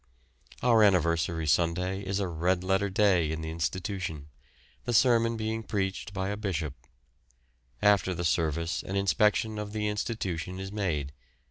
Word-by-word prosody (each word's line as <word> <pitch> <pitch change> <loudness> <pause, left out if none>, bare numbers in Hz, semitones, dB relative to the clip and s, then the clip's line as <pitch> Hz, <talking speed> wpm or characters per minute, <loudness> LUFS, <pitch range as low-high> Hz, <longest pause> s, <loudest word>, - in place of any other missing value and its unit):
Our 115 -3 +5
anniversary 85 -4 +2
Sunday 90 +5 +1
is 95 0 -2
a 100 - 0
red 90 +2 0
letter 95 +2 +1
day 95 -5 +3
in 80 0 -3
the 80 0 -4
institution, 85 -2 -3 0.6
the 120 - -1
sermon 115 -1 +4
being 110 +1 -2
preached 100 -3 -3
by 95 0 -2
a 105 - -3
bishop. 85 -9 -2 1.1
After 100 -2 +4
the 85 - -3
service 80 0 0
an 95 - -5
inspection 105 +2 +2
of 105 0 -5
the 105 -1 -1
institution 95 -4 -3
is 95 0 -5
made. 80 -9 -2
95 Hz, 145 wpm, -29 LUFS, 85-105 Hz, 1.1 s, Our